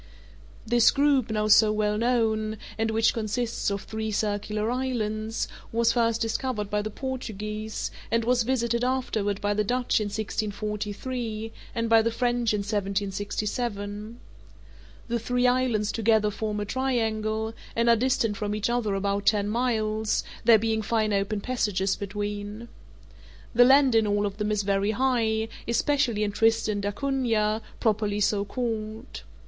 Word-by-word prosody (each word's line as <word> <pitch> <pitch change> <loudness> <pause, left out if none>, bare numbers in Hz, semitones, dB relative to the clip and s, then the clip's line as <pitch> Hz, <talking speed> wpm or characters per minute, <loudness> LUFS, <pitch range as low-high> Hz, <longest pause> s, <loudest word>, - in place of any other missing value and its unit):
This 235 0 +5
group, 280 -4 +2
now 215 -1 0
so 215 0 +6
well 210 0 +1
known, 220 -2 +1 0.2
and 225 0 0
which 220 +1 +3
consists 225 +1 -1
of 200 0 -3
three 220 0 -4
circular 210 +1 -1
islands, 225 -4 -2 0.2
was 230 0 +2
first 230 -2 +2
discovered 225 -2 -2
by 210 0 +1
the 215 - -4
Portuguese, 215 -4 -4 0.2
and 230 0 +1
was 245 0 +3
visited 235 -1 0
afterward 225 -6 -1
by 205 0 +1
the 210 +1 +1
Dutch 245 +1 +1
in - - -1
1643, 215 +2 -3 0.2
and 230 -1 0
by 225 0 +6
the 230 - +1
French 240 0 0
in 210 -1 0
1767. 205 +2 -3 0.9
The 235 0 -1
three 245 +2 0
islands 245 -4 +2
together 220 -2 +2
form 210 0 -3
a 205 - -2
triangle, 220 -3 -1 0.2
and 235 +1 +1
are 235 - +7
distant 230 -3 +1
from 210 0 -2
each 210 +2 -1
other 225 -5 0
about 200 +1 -1
ten 205 -2 +3
miles, 220 -2 0 0.2
there 230 -1 +8
being 220 0 0
fine 215 -1 0
open 200 +1 0
passages 200 -5 0
between. 205 +2 -5 0.8
The 245 +1 +7
land 270 0 +6
in 225 -1 +4
all 205 0 +1
of 200 0 -4
them 210 0 -1
is 210 -1 0
very 200 +1 +1
high, 225 -4 +1 0.2
especially 235 -2 +1
in 205 - 0
Tristan 220 -1 +2
d'Acunha, 220 -1 0 0.2
properly 210 -2 +1
so 205 0 +2
called. 220 +1 -4
220 Hz, 145 wpm, -26 LUFS, 210-235 Hz, 0.9 s, there